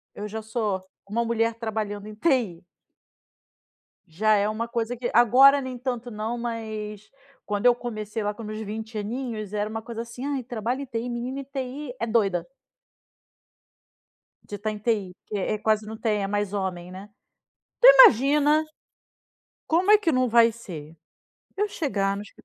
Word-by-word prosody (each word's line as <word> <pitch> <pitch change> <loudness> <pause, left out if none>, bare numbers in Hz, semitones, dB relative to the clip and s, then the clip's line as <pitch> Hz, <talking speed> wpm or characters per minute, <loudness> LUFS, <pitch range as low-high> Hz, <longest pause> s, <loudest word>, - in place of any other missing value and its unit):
eu 210 +1 -5
já 220 +1 -5
sou 215 -4 -2 0.2
uma 230 +3 0
mulher 230 0 0
trabalhando 215 -2 -4
em 215 - -9
TI. 220 - 0 1.4
Já 210 +6 +2
é 205 0 +2
uma 225 +2 -3
coisa 235 0 -2
que 240 +1 -2
agora 260 +5 +7
nem 260 -1 -5
tanto 245 -1 -4
não, 220 +2 -3
mas, 215 -3 -5 0.3
quando 205 +2 -2
eu 245 -1 +7
comecei 215 -2 -5
lá 205 0 -1
com 210 - -11
os - - -7
meus 215 0 -5
20 220 +1 -6
aninhos 215 -1 -4
era 210 0 -1
uma 225 0 -4
coisa 230 0 -6
assim: 235 +3 -7
"Ai, 280 -3 -2
trabalha 240 +3 -3
em - - -5
TI, 235 0 -4
menina 245 +3 -4
em - - -8
TI 265 0 -6
é 230 - -1
doida" 200 -6 +1 2.0
"de 205 - -6
estar 210 +2 -3
em 210 - -6
TI", 205 -4 -1
porque, 210 - -7
é, 215 +3 -1
quase 215 0 +1
não 220 +1 -7
tem, 215 -3 0
é 195 - -1
mais 205 -1 -2
homem, 180 -3 -3
né? 190 +2 -9 0.8
Então, - - +12
imagina, 295 - +4 1.0
como 360 +5 +3
é 425 - +9
que 410 -6 0
não 255 -2 +2
vai 230 0 +6
ser 165 -9 -10 0.6
eu 415 +1 0
chegar 200 - -1
no 200 - -5
escri 210 - -16
225 Hz, 175 wpm, -25 LUFS, 210-245 Hz, 2.0 s, Então